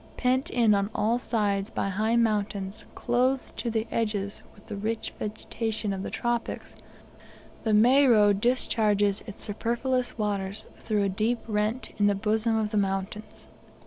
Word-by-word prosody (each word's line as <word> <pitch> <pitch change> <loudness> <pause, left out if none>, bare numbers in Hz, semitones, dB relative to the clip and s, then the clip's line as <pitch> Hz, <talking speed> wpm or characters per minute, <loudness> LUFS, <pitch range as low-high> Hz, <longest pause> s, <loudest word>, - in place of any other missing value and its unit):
Pent 255 +1 +1
in 230 -3 +3
on 200 0 +1
all 225 +3 +1
sides 205 -4 0
by 195 - -2
high 215 +4 +1
mountains, 205 -3 0
clothed 255 +2 0
to 240 - -2
the 220 -1 -1
edges 210 -3 -2
with 205 - -19
the - - -6
rich 220 +3 -3
vegetation 220 0 -3
of 190 - -4
the - - -4
tropics, 240 -1 -3 0.9
the 220 - 0
Moero 230 -3 +6
discharges 205 -2 +2
its 205 - -7
superfluous 240 +4 -1
waters 205 -1 -1
through 210 -2 -1
a 200 - +1
deep 220 +5 0
rent 215 +3 -1
in 205 - +4
the 205 - +3
bosom 220 +2 +1
of 215 -1 -1
the 215 - 0
mountains. 195 +2 -3
215 Hz, 150 wpm, -27 LUFS, 205-235 Hz, 0.9 s, Moero